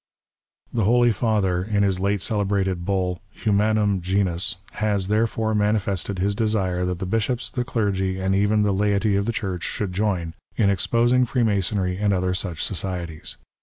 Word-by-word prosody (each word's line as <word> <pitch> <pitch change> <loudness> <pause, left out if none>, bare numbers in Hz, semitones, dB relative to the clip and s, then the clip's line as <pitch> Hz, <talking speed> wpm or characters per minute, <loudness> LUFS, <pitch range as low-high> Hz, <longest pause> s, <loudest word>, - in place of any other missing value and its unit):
The 115 -4 +1
Holy 120 +2 +4
Pather, 100 -5 +1
in 100 -2 +1
his 95 -2 +1
late 100 0 0
celebrated 95 -4 0
Eull, 90 -2 0 0.2
Humanmn 105 -2 +2
Genus^ 95 +1 0 0.2
has, 100 -3 -1
therefore, 110 0 +1
manifested 105 -2 0
his 100 +3 +1
desire 100 -5 0
that 90 -1 -2
the 95 - -4
bishops, 115 +5 -1
the 125 - -1
clergy, 95 -5 -1
and 95 0 0
even 105 +2 +3
the 100 -1 +2
laity 100 +1 +1
of 100 0 +1
tlie 115 - -1
Church 95 -5 -3
should 100 -4 -3
join 90 -5 -1 0.2
in 100 -2 +3
exposing 120 +6 +3
Freemasonry 100 -6 0
and 105 0 +1
other 90 -1 0
such 90 -4 -2
societies. 90 -4 -4
100 Hz, 160 wpm, -23 LUFS, 95-110 Hz, 0.2 s, Holy